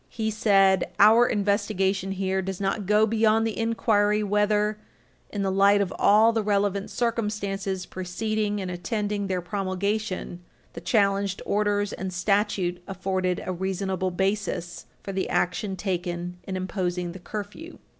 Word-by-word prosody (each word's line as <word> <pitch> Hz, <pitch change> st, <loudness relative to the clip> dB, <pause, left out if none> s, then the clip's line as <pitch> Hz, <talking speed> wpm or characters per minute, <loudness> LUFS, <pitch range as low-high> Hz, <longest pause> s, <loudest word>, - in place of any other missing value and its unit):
He 220 Hz, -1 st, -2 dB
said: 195 Hz, -3 st, +3 dB
"Our 225 Hz, +4 st, +7 dB
investigation 195 Hz, -2 st, 0 dB
here 190 Hz, 0 st, -1 dB
does 190 Hz, 0 st, -5 dB
not 195 Hz, 0 st, -2 dB
go 210 Hz, +1 st, +4 dB
beyond 220 Hz, 0 st, +2 dB
the 225 Hz, -, -2 dB
inquiry 215 Hz, -2 st, +1 dB
whether, 210 Hz, +1 st, +1 dB, 0.5 s
in 205 Hz, -1 st, -3 dB
the 190 Hz, -, 0 dB
light 200 Hz, +1 st, +5 dB
of 195 Hz, -2 st, -1 dB
all 220 Hz, +3 st, +5 dB
the 225 Hz, -, +1 dB
relevant 200 Hz, -1 st, 0 dB
circumstances 205 Hz, -5 st, -2 dB
preceding 210 Hz, +3 st, -2 dB
and 185 Hz, -2 st, -4 dB
attending 205 Hz, +2 st, -2 dB
their 185 Hz, -1 st, -1 dB
promulgation, 195 Hz, -1 st, -2 dB, 0.3 s
the -, -, -8 dB
challenged 200 Hz, -3 st, +1 dB
orders 205 Hz, 0 st, 0 dB
and 190 Hz, 0 st, -4 dB
statute 185 Hz, -1 st, 0 dB
afforded 185 Hz, -1 st, -2 dB
a 185 Hz, -, -2 dB
reasonable 190 Hz, 0 st, -2 dB
basis 190 Hz, -1 st, -2 dB, 0.2 s
for 195 Hz, -, -5 dB
the 190 Hz, -1 st, -2 dB
action 190 Hz, +2 st, 0 dB
taken 175 Hz, -1 st, -3 dB
in 190 Hz, -1 st, -3 dB
imposing 180 Hz, -2 st, -2 dB
the 185 Hz, -, -9 dB
curfew." 215 Hz, -, -7 dB
200 Hz, 140 wpm, -25 LUFS, 185-210 Hz, 0.5 s, Our